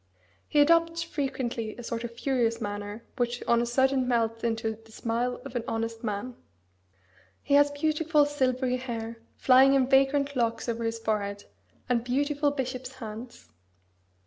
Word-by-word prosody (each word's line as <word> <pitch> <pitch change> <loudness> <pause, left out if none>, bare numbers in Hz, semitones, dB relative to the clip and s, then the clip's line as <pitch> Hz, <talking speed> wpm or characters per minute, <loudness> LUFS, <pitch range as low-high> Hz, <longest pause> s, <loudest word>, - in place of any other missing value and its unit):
He 295 - +2
adopts 330 +2 +4
frequently 255 -8 -3
a 240 - -8
sort 230 0 -4
of 235 0 -7
furious 240 -4 +1
manner 205 +1 -5
which 245 -1 -1
on 235 0 +4
a 240 - -1
sudden 260 +1 +2
melts 230 -2 0
into 225 -1 -1
the 225 - -19
smile 235 +2 -2
of 270 -2 -8
an 240 - -1
honest 225 -1 -3
man. 220 +3 -3 1.1
He - - -1
has 290 0 +6
beautiful 305 +1 +2
silvery 255 -3 0
hair, 230 -2 -5 0.2
flying 265 +1 +6
in 265 -1 +4
vagrant 275 +1 +3
locks 230 -1 0
over 230 0 -2
his 225 0 -1
forehead, 205 -2 -2 0.4
and 240 -2 +1
beautiful 285 +4 +1
bishop's 260 -2 -4
hands. 230 -1 -9
245 Hz, 150 wpm, -28 LUFS, 230-275 Hz, 1.1 s, has